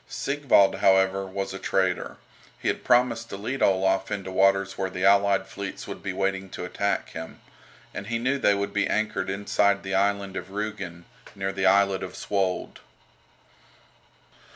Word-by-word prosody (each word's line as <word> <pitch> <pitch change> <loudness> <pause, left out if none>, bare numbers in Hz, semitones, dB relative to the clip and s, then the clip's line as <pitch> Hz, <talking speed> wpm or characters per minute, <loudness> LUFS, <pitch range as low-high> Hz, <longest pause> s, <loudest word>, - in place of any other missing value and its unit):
Sigvald, 135 -9 +2
however, 95 0 +3
was 95 0 -4
a 95 - -6
traitor. 95 -2 -1 0.4
He - - -1
had - - -2
promised 120 -2 +2
to - - -6
lead 125 +7 -4
Olaf 95 0 +2
into 95 -2 -4
waters 95 0 +2
where 95 -1 -2
the 95 0 -2
allied 100 0 +4
fleets 100 -1 -7
would - - -7
be 100 - -3
waiting 95 0 -2
to 90 - -6
attack 100 +2 -2
him. 80 0 -8 0.5
And 100 - -6
he 115 0 -1
knew 130 +4 0
they 100 -5 +3
would 100 0 -3
be 105 - +1
anchored 110 -2 -1
inside 100 0 +1
the 95 0 -4
island 100 0 0
of - - -5
Rügen, 100 -4 -5 0.3
near 95 0 -2
the 95 0 +1
islet 100 0 +3
of - - -6
Svold. 95 -2 -2
100 Hz, 165 wpm, -26 LUFS, 95-100 Hz, 0.5 s, allied